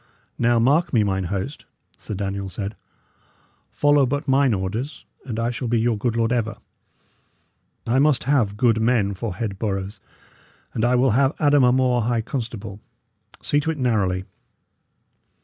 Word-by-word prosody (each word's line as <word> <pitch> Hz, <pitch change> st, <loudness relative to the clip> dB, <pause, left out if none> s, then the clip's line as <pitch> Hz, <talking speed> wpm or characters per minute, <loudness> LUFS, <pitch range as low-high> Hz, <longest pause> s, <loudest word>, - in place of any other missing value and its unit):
"Now, 120 Hz, 0 st, +3 dB
mark 145 Hz, +9 st, +2 dB
me, 110 Hz, -3 st, +4 dB
mine 95 Hz, -2 st, -1 dB
host," 100 Hz, -, -4 dB, 0.3 s
Sir 105 Hz, -, -7 dB
Daniel 100 Hz, 0 st, -3 dB
said, 100 Hz, +2 st, -5 dB, 0.9 s
"follow 145 Hz, -2 st, +3 dB
but 145 Hz, +4 st, -2 dB
mine 135 Hz, -1 st, +3 dB
orders, 110 Hz, +8 st, -3 dB, 0.2 s
and 115 Hz, -4 st, -4 dB
I 115 Hz, +1 st, 0 dB
shall 120 Hz, +1 st, -4 dB
be 115 Hz, 0 st, +1 dB
your 115 Hz, 0 st, +1 dB
good 115 Hz, +2 st, -1 dB
lord 115 Hz, +1 st, +1 dB
ever. 115 Hz, -2 st, -1 dB, 1.3 s
I 120 Hz, +3 st, +2 dB
must 145 Hz, -1 st, +3 dB
have 120 Hz, -7 st, +1 dB
good 115 Hz, -1 st, +3 dB
men 110 Hz, -4 st, +2 dB
for 90 Hz, -1 st, -5 dB
head 100 Hz, -2 st, -4 dB
boroughs, 100 Hz, -1 st, -3 dB, 0.7 s
and 110 Hz, -, -2 dB
I 120 Hz, +1 st, +3 dB
will 125 Hz, 0 st, +3 dB
have 135 Hz, +5 st, +2 dB
Adam 145 Hz, -3 st, +4 dB
a 125 Hz, -, +5 dB
More 125 Hz, -1 st, +2 dB
high 115 Hz, 0 st, 0 dB
constable; 110 Hz, -5 st, -5 dB, 0.6 s
see 145 Hz, -, +2 dB
to 155 Hz, +2 st, -2 dB
it 160 Hz, -, -2 dB
narrowly. 100 Hz, -8 st, 0 dB
115 Hz, 160 wpm, -22 LUFS, 105-130 Hz, 1.3 s, a